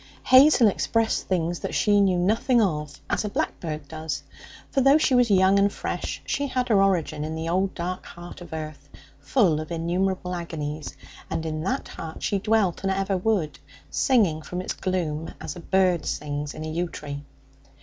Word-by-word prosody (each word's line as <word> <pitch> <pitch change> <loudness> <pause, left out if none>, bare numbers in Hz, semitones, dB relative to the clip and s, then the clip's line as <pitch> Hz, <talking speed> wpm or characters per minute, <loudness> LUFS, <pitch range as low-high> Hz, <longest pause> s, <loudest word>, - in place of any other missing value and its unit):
Hazel 260 -2 +7
expressed 225 +2 0
things 175 -2 0
that - - -4
she 205 -1 +4
knew 190 -2 +3
nothing 225 +7 +2
of, 150 -8 -1
as - - 0
a 210 - -2
blackbird 160 -5 -3
does. 160 0 -5 0.5
For, 275 - +2
though 275 +3 +6
she 310 -4 +2
was 245 -2 +4
young 190 0 +5
and 200 0 +3
fresh, - - -4
she 285 - -1
had 255 -1 -1
her 205 -3 +5
origin 170 -6 +1
in 155 +1 -4
the 160 +1 -4
old, 190 +3 0
dark 180 +1 -4
heart 175 +1 -10
of 175 - -11
earth, 155 -3 -7 0.3
full 185 - +2
of 155 - -8
innumerable 180 +2 -1
agonies, 155 -3 -5 0.3
and 160 - -3
in 155 -1 -3
that 260 +6 -1
heart 160 -1 -8
she 200 - +1
dwelt, 210 -3 +1
and 195 - 0
ever 195 0 0
would, 185 -5 0 0.3
singing 205 - +2
from 180 +3 -5
its 185 - -3
gloom 165 -4 -3
as - - -6
a - - -8
bird 185 -2 +1
sings 145 0 -3
in 155 - -6
a - - -4
yew 170 +2 -2
tree. 145 -2 -7
180 Hz, 185 wpm, -25 LUFS, 160-205 Hz, 0.5 s, Hazel